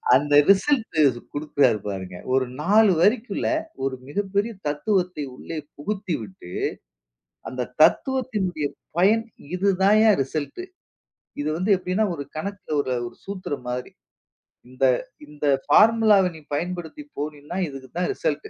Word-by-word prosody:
அந்த 145 +2 +2 0.2
ரிசல்ட் 190 - +3
குடுக்குறாரு 145 -6 +2
பாருங்க. 95 -2 -6 0.2
ஒரு 130 0 +3 0.2
4 205 +5 +5
வரிக்குள்ள 220 +6 +2 0.4
ஒரு 135 -1 -1
மிகப்பெரிய 200 +7 -1 0.2
தத்துவத்தை 180 +1 0
உள்ளே 165 +5 -7 0.2
புகுத்தி 190 +3 -3
விட்டு, 95 -4 -11 1.0
அந்த 130 - -4 0.2
தத்துவத்தினுடைய 200 - +2 0.3
பயன், 210 +6 +4 0.3
இதுதான்யா 200 +3 +4
ரிசல்ட். 145 - -5 0.8
இது 150 - -1
வந்து 185 +5 -1
எப்டின்னா, 185 +4 0
ஒரு 145 - -5
கணக்குல 190 -1 -4
ஒரு 130 -2 -2
ஒரு - - -12
சூத்திரம் 185 -10 -5
மாதிரி. 125 0 -4 0.8
இந்த 130 +1 -5 0.4
இந்த 150 0 -6 0.2
ஃபார்முலாவ 215 +3 +5
நீ - - -10
பயன்படுத்தி 175 - -4
போனினா 150 +2 -5
இதுக்கு 135 -2 -9
தான் 180 - 0
ரிசல்ட். 430 -1 -2
175 Hz, 115 wpm, -24 LUFS, 145-205 Hz, 1.0 s, 4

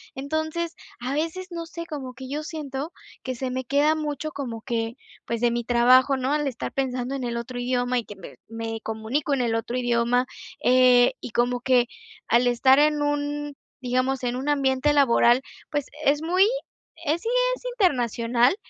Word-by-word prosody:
Entonces, 315 +4 -2 0.3
a 255 +2 -2
veces 330 +5 -2
no 335 -1 -5
sé 335 +1 -7
como 275 -6 -6
que 255 +1 -9
yo 295 +2 -3
siento 300 -1 -5 0.3
que 255 -1 -3
se 255 +1 -3
me 260 0 -3
queda 290 +4 +3
mucho, 305 0 -3
como 245 -6 -5
que, 230 -1 -2 0.3
pues, 235 -1 -3
de 240 -1 +3
mi 240 0 -2
trabajo 250 +3 +5
¿no?, 260 +2 -1
el 295 -1 0
estar 250 -3 -4
pensando 255 -1 -2
en 260 -2 -3
el 235 -1 -3
otro 240 +1 -5
idioma 245 0 0
y 235 - -6
que 205 - -10
me 190 - -11
me 225 0 -5
comunico 220 +7 -2
en 270 - +1
el 230 -2 0
otro 225 +2 -3
idioma, 245 0 +2 0.4
eh, 250 -1 +5
y - - -8
como 245 +2 +1
que 250 -1 +3 0.4
al 240 +2 +4
estar 260 +2 +5
en 300 0 +3
un, 290 0 -2 0.3
digamos, 255 +1 0
en 245 0 -1
un 260 +3 -4
ambiente 275 0 +2
laboral, 250 -3 +5 0.3
pues, 290 -2 -1 0.2
es 290 +2 +3
muy 365 +4 +4 0.6
es 315 +3 +1
sí, 455 - -1 0.3
es - - -17
internacional, 245 - +2
260 Hz, 185 wpm, -25 LUFS, 240-290 Hz, 0.6 s, trabajo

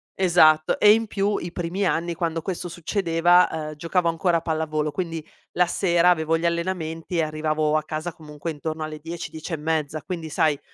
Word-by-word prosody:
esatto. 160 -4 +4
E 210 0 +8
in 225 0 0
più 200 0 0
i 170 - -5
primi 180 +3 -2
anni, 170 0 0
quando 165 -1 -2
questo 180 +1 -4
succedeva, 175 0 +3 0.2
ehm, 155 - -8
giocavo 170 +3 0
ancora 170 +1 +1
a - - -3
pallavolo, 155 -2 -1
quindi 165 -2 -4 0.3
la 180 0 +3
sera 175 -1 +3
avevo 165 -2 +2
gli 165 - -3
allenamenti 170 -1 -2
e 165 - +3
arrivavo 155 0 0
a 155 - -1
casa, 155 +3 -4
comunque, 150 +1 -7
intorno 155 +1 -4
alle 155 0 -6
10-10 165 +1 -7
e - - -1
mezza, 155 0 -2
quindi, 165 -4 -5
sai, 150 -1 +1
165 Hz, 185 wpm, -24 LUFS, 155-175 Hz, 0.3 s, E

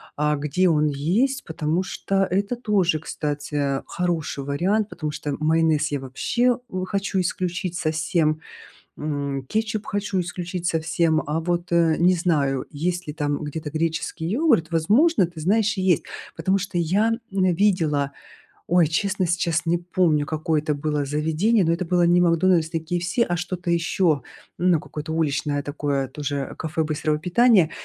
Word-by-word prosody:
а, 150 0 +1
где 150 +6 +1
он 150 -2 +3
есть, 190 - 0
потому 160 +2 -1
что 195 0 -1
это 200 +5 0
тоже, 195 -9 +1
кстати, 150 -1 -4
а, 140 -1 0
хороший 165 -5 -2
вариант. 190 +10 0
Потому 155 -6 -4
что 145 -1 -4
майонез 155 -1 +2
я 145 - -1
вообще 235 - 0
у 185 0 -3
хочу 195 0 -1
исключить 180 -1 -2
совсем, 155 -1 0 0.6
м, 140 -3 -3
кетчуп 215 -1 -2
хочу 205 -2 -1
исключить 175 0 -4
совсем, 160 -1 +1
а 150 +2 -1
вот, 175 +1 -2
э, 165 -2 +4
не 180 +2 +4
знаю, 145 -7 0
есть 175 +4 -2
ли 150 - -4
там 145 -1 -2
где-то 150 +1 -5
греческий 160 +1 -2
йогурт, 210 - +2
возможно, 205 - +3
ты 170 -1 -10
знаешь, 210 +5 +2
и - - 0
есть. 180 -5 +2 0.3
Потому 195 +1 +1
что 195 -1 -5
я, 190 +7 +2 0.2
м, 185 -2 +2
видела, 160 -8 +1 0.6
ой, 170 -2 +4
честно, 190 +3 0
сейчас 170 -1 0
не 170 +1 +1
помню, 170 -4 +1
какое 155 0 0
это 150 -1 -1
было 150 0 -1
заведение, 160 +9 +1
но 165 - +2
это 170 +2 -1
было 175 +1 +2
не 175 +1 +4
"Макдональдс", 170 -1 +3
не 165 - -1
KFC, 175 +7 -1
а 175 -6 0
что-то 175 0 -3
ещё. 165 -3 +1 0.4
Ну 175 -3 +3
какое-то 155 +1 -6
уличное 145 -2 0
такое 145 -2 -2
тоже, 145 +2 -4
э, - - -8
кафе 160 +1 -2
быстрого 155 0 -1
питания. 185 0 +4
165 Hz, 160 wpm, -23 LUFS, 150-185 Hz, 0.6 s, э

